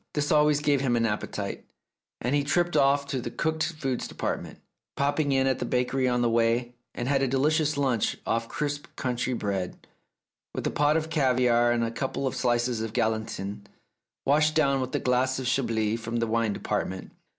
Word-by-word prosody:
This 150 -1 0
always 150 -1 +4
gave 145 -2 +2
him 125 -3 +1
an 115 -1 +2
appetite, 105 -2 -3 0.6
and 125 +3 -1
he 145 -1 +2
tripped 175 +4 +1
off 140 +1 +4
to 135 -2 -3
the 120 - -4
cooked 160 +6 -1
foods 135 -5 -3
department, - - -4 0.4
popping 145 +1 +1
in 135 -1 +3
at 130 -1 +1
the - - -1
bakery 130 +1 0
on 125 -1 +1
the - - +3
way, 115 +1 +1 0.2
and 120 - -3
had 135 0 +2
a 135 - +2
delicious 150 +3 +1
lunch 130 -6 +1
off 115 0 -1
crisp 145 -2 -3
country 125 -1 -1
bread, 100 -5 -3 0.7
with - - -3
a - - 0
pot 150 +1 +3
of 160 0 -3
caviare 125 -5 +3
and 120 -1 +1
a 115 - -1
couple 135 +3 -3
of 130 - -1
slices 120 -2 +1
of 110 -1 -4
galantine, 110 -3 -2 0.6
washed 150 +3 +3
down 140 -4 +3
with 130 0 -3
a - - +1
glass 130 +1 +1
of 130 - -4
Chablis 115 -4 0
from 115 0 -5
the 115 0 +1
wine 115 -1 0
department. 95 -1 -3
130 Hz, 190 wpm, -27 LUFS, 115-145 Hz, 0.7 s, always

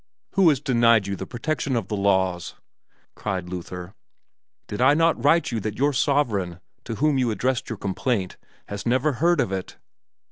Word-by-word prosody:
"Who 190 -4 +5
has 145 -4 +2
denied 115 -5 +3
you 100 0 -3
the - - -7
protection 135 +2 -2
of 115 -5 -1
the 105 - -2
laws?" 95 -3 0 0.6
cried 95 -4 -4
Luther. 90 +1 -7 0.7
"Did 105 - -5
I 140 +3 +6
not 165 -6 +2
write 160 +1 +3
you 115 - -1
that 110 0 -4
your 140 +3 +2
sovereign, 115 - 0 0.3
to 115 - -4
whom 145 +2 +2
you 125 -2 +1
addressed 125 +5 -1
your 115 - -4
complaint, 95 0 -2 0.3
has 100 0 -5
never 130 +5 +2
heard 165 +5 +2
of 95 - +1
it? 95 -1 -5
115 Hz, 175 wpm, -24 LUFS, 95-140 Hz, 0.7 s, I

